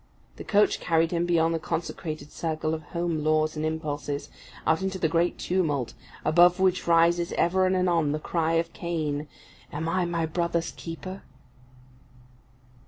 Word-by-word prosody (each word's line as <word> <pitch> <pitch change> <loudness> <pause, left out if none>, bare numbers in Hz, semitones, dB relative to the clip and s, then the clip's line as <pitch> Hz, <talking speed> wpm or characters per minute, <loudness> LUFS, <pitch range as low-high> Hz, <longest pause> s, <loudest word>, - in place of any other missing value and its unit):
The - - -7
coach 210 -1 +3
carried 165 -1 +2
him 170 0 0
beyond 165 -1 +3
the 165 - -1
consecrated 155 -2 -4
circle 155 -1 -2
of 160 - -3
home 170 0 -2
laws 155 0 +2
and 155 - -3
impulses, 150 -2 -3 0.3
out 160 +3 +2
into 190 0 -2
the 170 - +1
great 170 +2 +1
tumult, 145 -10 -1 0.3
above 175 +3 +5
which 185 -2 +2
rises 170 +1 +3
ever 185 +2 +2
and 185 - +2
anon 170 -5 +2
the 150 - 0
cry 165 +1 -1
of 165 0 0
Cain, 155 -4 -2 0.4
"Am 160 +2 -3
I 180 +1 +1
my 170 -1 -1
brother's 170 +1 -1
keeper?" 185 +3 -7
165 Hz, 155 wpm, -27 LUFS, 155-175 Hz, 0.4 s, above